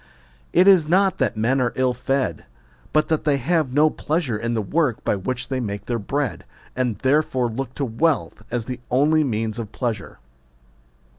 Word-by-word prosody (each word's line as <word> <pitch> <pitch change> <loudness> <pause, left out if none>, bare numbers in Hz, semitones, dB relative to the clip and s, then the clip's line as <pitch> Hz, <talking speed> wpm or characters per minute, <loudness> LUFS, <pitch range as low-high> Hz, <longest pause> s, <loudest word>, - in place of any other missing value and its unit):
It 180 +3 +5
is 185 -6 +6
not 190 +3 +3
that 120 -5 0
men 125 +5 +2
are 120 -2 0
ill 130 -1 +1
fed, 130 +2 -2 0.4
but 155 0 +2
that 160 -2 +1
they 145 -2 +2
have 155 +1 0
no 150 +3 +4
pleasure 150 -7 -1
in 115 +2 -2
the 110 - 0
work 145 - 0
by - - +1
which 125 +6 -4
they 130 -1 -1
make 105 -4 -4
their 120 -1 -2
bread, 120 -3 -2 0.3
and 125 -5 -1
therefore 130 -1 +1
look 125 +2 -5
to 140 - -1
wealth 140 +6 0
as 120 -2 -2
the 125 0 -5
only 150 +5 +3
means 115 -3 -2
of 110 -2 -6
pleasure. 115 -5 -4
130 Hz, 180 wpm, -22 LUFS, 115-150 Hz, 0.4 s, is